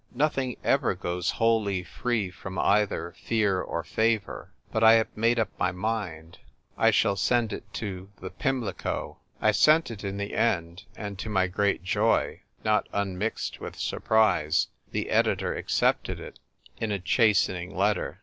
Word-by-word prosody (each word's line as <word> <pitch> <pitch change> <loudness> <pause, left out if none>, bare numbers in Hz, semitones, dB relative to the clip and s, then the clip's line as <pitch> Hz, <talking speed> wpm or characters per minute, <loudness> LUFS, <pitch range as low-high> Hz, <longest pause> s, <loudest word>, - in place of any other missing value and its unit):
Nothing 135 -4 0
ever - - +2
goes 90 0 -2
wholly 110 -5 +1
free 105 +1 -2
from 95 +1 -8
either 100 -4 +1
fear 105 -5 +1
or 85 - -3
favour. 110 -3 -1 0.2
But 110 - 0
I 110 0 +9
have 115 -1 +2
made 115 +2 +2
up 115 - +1
my 90 +1 +2
mind. 90 -5 -4 0.4
I - - +4
shall 100 - +3
send 115 +3 +1
it - - -8
to 95 -3 -5
The 95 - -7
Pimlico.'" 125 -9 -3 0.2
I 110 - +4
sent 155 +6 +4
it 110 -2 -8
in 100 0 -3
the 100 0 -4
end; 85 -5 0
and, 100 -3 -6
to 110 - -4
my 95 -3 +2
great 100 +1 0
joy, 105 +5 +1 0.2
not 105 0 +2
unmixed 100 +2 -2
with - - -7
surprise, 95 -8 +2 0.2
the - - -3
editor - - +1
ac - - -6
cepted - - +1
it, - - -10 0.4
in 110 -1 -1
a 100 - 0
chastening 95 -2 +1
letter. 105 +2 0
100 Hz, 160 wpm, -27 LUFS, 95-115 Hz, 0.4 s, I